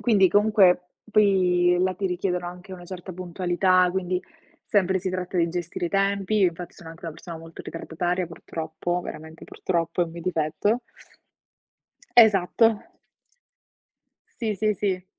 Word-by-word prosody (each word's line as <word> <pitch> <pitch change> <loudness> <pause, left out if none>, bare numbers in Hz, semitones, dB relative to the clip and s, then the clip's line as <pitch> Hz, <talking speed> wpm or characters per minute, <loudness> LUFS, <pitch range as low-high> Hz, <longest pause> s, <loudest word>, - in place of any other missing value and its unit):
Quindi, 200 -6 +4
comunque, 200 -4 +4 0.2
poi 180 -4 +4
là 185 0 +1
ti 190 +2 -2
richiedono 180 -1 -2
anche 180 +2 -11
una 180 -1 -9
certa 185 0 -8
puntualità, 180 +1 +2
quindi 185 -1 -1 0.4
sempre 190 -2 +2
si 185 +1 -3
tratta 185 0 -4
di 170 -1 +3
gestire 175 0 -3
i - - -3
tempi. 200 +2 +1
Infatti 175 -1 0
sono 165 - -12
anche 165 +1 -13
una 165 - -4
persona 170 -2 -9
molto 165 0 -11
ritardataria, 175 +2 -3
purtroppo, 165 +1 -4
veramente 160 +1 -9
purtroppo, 170 -1 -2
è - - +2
un 165 - -9
mio 170 - -8
difetto 180 +7 0 1.4
Esatto. 220 0 +5 1.6
Sì, 220 -3 -1
sì, 215 +2 +1
sì. 185 -2 -2
180 Hz, 140 wpm, -25 LUFS, 175-195 Hz, 1.6 s, Esatto